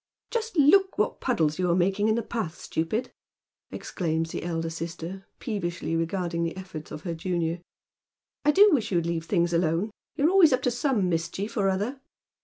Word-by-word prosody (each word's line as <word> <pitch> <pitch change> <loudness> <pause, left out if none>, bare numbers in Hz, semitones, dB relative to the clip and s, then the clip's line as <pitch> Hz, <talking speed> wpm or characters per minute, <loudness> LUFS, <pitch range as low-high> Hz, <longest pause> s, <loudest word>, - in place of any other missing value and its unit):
" - - -51
Just 455 -4 -2
look 380 +7 +5
what - - 0
puddles 160 - +1
you 180 -1 +1
are 170 - +3
making 195 +3 +2
in 220 - +3
the 235 - -1
path, 210 -8 -3
stupid," 215 +10 -2 0.6
exclaims 165 -2 -2
the - - -4
elder 165 -1 -2
sister, 165 +3 -6
peevishly 175 -7 -3
regarding 170 0 -1
the 165 +2 -3
efforts 185 -5 -8
of 155 - -7
her 170 - -3
junior. 170 0 -2 0.4
" - - -66
I 295 - +3
do 400 +7 +7
wish 260 -11 +1
you'd 170 -3 +1
leave 165 -1 -2
things 170 -2 +1
alone. 170 +5 +1 0.2
You're 300 +4 +3
always 360 -7 +6
up 255 - +1
to 250 - +2
some 245 -5 +1
mischief 175 +5 -2
or 200 -4 +2
other." 210 +8 -2
185 Hz, 190 wpm, -27 LUFS, 165-235 Hz, 0.6 s, do